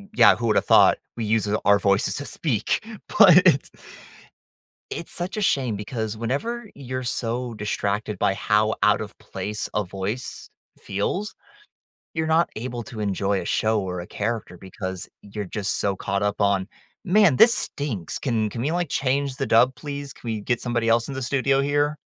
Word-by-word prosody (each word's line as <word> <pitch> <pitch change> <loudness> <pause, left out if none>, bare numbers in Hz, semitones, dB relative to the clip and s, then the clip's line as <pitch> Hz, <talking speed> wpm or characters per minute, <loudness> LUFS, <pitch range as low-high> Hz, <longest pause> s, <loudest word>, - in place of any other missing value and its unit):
yeah, - - +7
who 115 - -2
would 110 - +2
have - - +2
thought - - +6 0.2
we 115 - -3
use 110 0 +1
it 105 +1 0
our 100 0 +6
voices 100 0 +2
to 145 - -4
speak? 130 - -1 0.3
But 185 -6 +9
it's 140 -7 +4 1.2
it's 170 - -6
such 175 +4 -4
a - - -1
shame 130 - +1
because 110 0 -4
whenever 200 - -3
you're 130 -1 -5
so 120 0 -2
distracted 105 -1 -2
by 95 - +2
how 105 +2 +2
out - - +4
of - - -7
place 105 0 -5
a 105 - +2
voice 95 +6 -5 0.3
feels, 180 - -3 0.8
you're 160 -1 -1
not 160 +2 +3
able 120 +1 -4
to 110 0 -10
enjoy 100 -1 0
a - - -6
show 110 -1 +1
or 90 -2 -4
a 85 - -8
character 105 -4 -4
because 95 -1 -6
you're 105 0 -6
just 100 +1 -2
so 100 -1 +1
caught 100 +1 -2
up 105 0 -1
on, 100 -2 +2 0.4
"Man, 190 -7 +4
this 230 +1 +7
stinks. 115 - -3
Can 115 -5 0
can 115 - -5
we, 150 - 0
like, 175 -1 -1
change 135 0 0
the 135 - -2
dub, 125 +3 +4
please? 145 -2 -6
Can - - -15
we 110 -2 -2
get 120 +3 -1
somebody 120 -2 -1
else 115 +1 +3
in 140 - -5
the 135 - -4
studio 135 +2 +1
here?" 145 +1 +1
115 Hz, 185 wpm, -24 LUFS, 105-140 Hz, 1.2 s, But